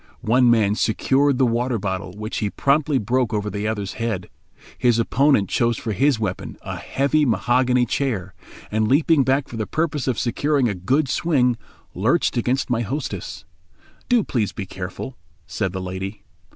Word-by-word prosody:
One 125 +3 +4
man 110 -4 +4
secured 135 +6 +2
the 130 - +4
water 120 +1 0
bottle, 95 -2 -4
which 110 +1 -4
he 105 - -1
promptly 140 +4 +1
broke 120 0 0
over 105 0 -2
the 105 +1 -3
other's 100 -3 -3
head. 110 -6 -2 0.4
His 120 -2 +2
opponent 115 -2 +3
chose 120 -2 +1
for 115 - -4
his 135 +4 +2
weapon 100 -4 -4
a - - -5
heavy 140 +3 +1
mahogany 125 +2 +2
chair, 110 -8 -2 0.4
and 110 0 +1
leaping 145 +3 +4
back 135 +1 +1
for 115 - -8
the 110 -2 -2
purpose 150 - -1
of 130 - 0
securing 140 +2 +1
a 105 - 0
good 130 - +1
swing, 130 -4 +2 0.4
lurched 120 - +1
against 125 +3 0
my 120 -2 0
hostess. 120 - -5 0.6
"Do 240 -3 +4
please 115 - -1
be 100 - -5
careful," 95 +7 -7 0.3
said 95 - -2
the 95 - -4
lady. 95 +3 -5
120 Hz, 165 wpm, -22 LUFS, 105-135 Hz, 0.6 s, One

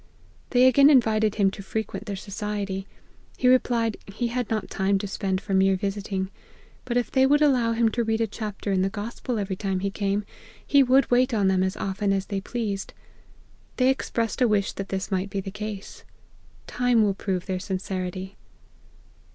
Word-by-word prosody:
They 250 0 +5
again 275 +2 +7
invited 220 -6 +3
him 195 -2 +3
to 200 - -8
frequent 220 +2 -4
their 200 - -3
society; 200 0 -4 0.5
he 250 - +2
replied, 235 -3 +3
he 225 +4 -3
had 245 -1 -2
not 220 -1 -1
time 195 0 +1
to 195 - -4
spare 190 -1 -1
for 195 +1 -5
mere 190 0 +4
visiting; 195 0 -3 0.5
bat 245 -1 -1
if 245 - -1
they 265 0 +4
would 290 +2 +4
allow 250 -5 +3
him 230 0 +3
to 235 +2 -1
read 225 0 0
a 225 - +2
chapter 210 -1 -5
in 190 -1 +2
the 190 - +1
gospel 225 +4 -4
every 200 -2 -2
time 190 -1 -2
he 200 0 -1
came, 200 0 -1 0.4
he 280 - +5
would 265 +1 +4
wait 250 0 +3
on 200 -3 +3
them 190 -1 +2
as 190 0 -1
often 195 +1 -1
as 195 -1 -1
they 195 -1 -3
pleased. 205 -3 -4 0.8
They 255 0 +4
expressed 235 -3 -1
a 250 - +6
wish 205 -2 +1
that 195 0 -6
this 195 +1 -3
might 190 +1 -1
be 200 - -3
the 195 0 -5
case. 210 -1 -7 0.6
Time 245 -2 +2
will 205 -2 +2
prove 190 -2 -3
their 185 -2 -2
sincerity." 185 0 -4
205 Hz, 190 wpm, -25 LUFS, 195-235 Hz, 0.8 s, again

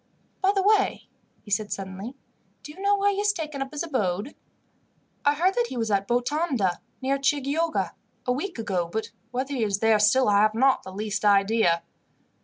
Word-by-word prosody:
"By 385 +1 +4
the 390 - +2
way," 405 -1 +2 0.3
he 205 - -12
said 205 +1 0
suddenly, 195 +6 -6 0.5
"do 295 - -9
you 370 - -12
know 405 +1 +3
where 405 0 +3
he 400 - -3
has 415 0 +3
taken 305 -6 -5
up 270 - -4
his 300 +2 -3
abode?" 220 - -2 0.9
"I 290 0 +3
heard 360 +5 +2
that 475 +2 +1
he 255 - -6
was 225 -2 -1
at 200 0 +1
Botonda, 245 - 0 0.2
near 275 +1 +1
Chioggia, 290 +4 0 0.3
a 250 - +1
week 325 +8 -3
ago, 190 -6 -1
but 220 +3 -3 0.2
whether 260 +3 -3
he 250 -4 0
is 200 -2 0
there 220 0 +3
still 255 +6 +4
I 200 -1 +4
have 215 0 +3
not 265 +3 +3
the 190 - -10
least 210 +2 -3
idea." 200 -4 +3
250 Hz, 195 wpm, -25 LUFS, 205-305 Hz, 0.9 s, By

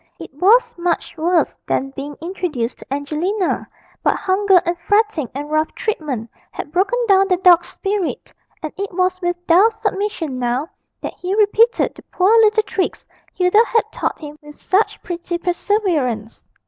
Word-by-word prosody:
It - - -10
was 405 - +4
much 340 -1 -1
worse 340 +1 +1
than 270 +1 -1
being 280 +1 -7
introduced 330 -9 -3
to - - -15
Angelina; 315 +8 -1 0.3
but - - +2
hunger 385 0 +3
and 345 - 0
fretting 410 - +1
and 290 +2 -5
rough 310 0 +1
treatment 290 - -3 0.2
had 295 - -7
broken 385 +8 +1
down 390 -1 +5
the 365 -2 +2
dog's 350 -2 +5
spirit, 395 -3 -3 0.3
and 310 - -4
it 400 +1 -4
was 365 +1 0
with 350 0 -2
dull 365 +7 +6
submission 410 - -3
now 250 +4 -1 0.3
that - - -5
he 365 +2 -2
repeated 440 +3 +3
the - - -14
poor 375 +3 +1
little 435 0 +4
tricks 385 -3 -3 0.3
Hilda 370 +5 +4
had 455 -2 +2
taught - - -2
him 300 -1 -10
with 295 0 -13
such 390 +4 0
pretty 345 0 -4
perseverance. 345 - -1
360 Hz, 160 wpm, -19 LUFS, 300-405 Hz, 0.3 s, dull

